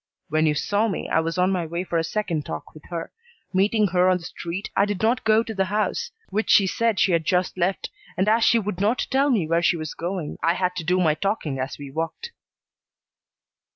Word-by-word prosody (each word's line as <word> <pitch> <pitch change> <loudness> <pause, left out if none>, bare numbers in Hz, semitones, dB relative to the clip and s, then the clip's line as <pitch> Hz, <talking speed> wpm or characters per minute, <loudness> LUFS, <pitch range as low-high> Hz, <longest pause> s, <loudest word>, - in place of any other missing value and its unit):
When 155 +1 +2
you 150 - +2
saw 205 +8 +1
me 195 - -3
I - - +2
was 165 +1 -2
on 180 +1 +3
my 180 -2 0
way 170 +2 -3
for 170 -2 -1
a - - 0
second 165 -4 -2
talk 80 - -7
with 155 - -14
her. 170 -2 -5 0.4
Meeting 205 +2 +3
her 180 +1 +3
on 185 - +3
the 175 - -12
street, 175 +3 -6
I 195 - +4
did 205 -1 -3
not 240 +3 +2
go 220 +1 +4
to 225 - -6
the 195 -2 +1
house, 210 +3 -1 0.2
which 215 +3 -1
she 200 - +6
said 225 +1 0
she 190 - +3
had 165 -2 +2
just 180 +1 0
left, 185 +1 -1 0.3
and 190 - +1
as 225 +2 +4
she 235 - +5
would 205 -4 -3
not 215 +5 +1
tell 275 +2 +3
me 215 - +2
where 165 +1 +2
she 170 - +2
was 155 -2 -5
going, 175 -3 -4
I 170 +1 +2
had 180 -1 -1
to 170 - -3
do 180 +3 +1
my 160 -4 +3
talking 155 -5 -2
as 130 +2 -4
we 140 -2 -9
walked." 165 - -4
185 Hz, 235 wpm, -24 LUFS, 165-210 Hz, 0.4 s, she